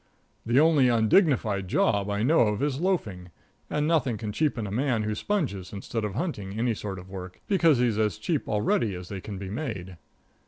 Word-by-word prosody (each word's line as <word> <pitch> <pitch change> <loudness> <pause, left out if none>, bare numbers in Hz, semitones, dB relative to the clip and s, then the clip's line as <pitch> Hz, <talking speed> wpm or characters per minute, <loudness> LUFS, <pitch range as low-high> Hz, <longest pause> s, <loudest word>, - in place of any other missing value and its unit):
The 120 +3 +4
only 150 -4 +5
undignified 115 - +3
job 100 +2 +1
I 100 +1 -1
know 155 +7 +4
of 105 +2 +2
is 145 -2 -1
loafing, 105 - -1 0.4
and 150 0 0
nothing 135 -8 +1
can 105 0 -4
cheapen 130 -2 0
a 100 - -5
man 120 0 0
who 105 0 -1
sponges 105 - -2
instead 105 +3 -4
of 105 -2 -3
hunting 105 - -3
any 120 +1 +1
sort 100 -2 -5
of 90 0 -10
work, 90 -1 -8
because 165 -8 +4
he's 120 -3 +1
as 105 -5 +1
cheap 160 -5 -2
already 105 -1 +1
as 90 0 -8
they 95 -2 -5
can 100 0 -7
be 95 0 -6
made. 100 - -5
110 Hz, 195 wpm, -27 LUFS, 100-140 Hz, 0.4 s, only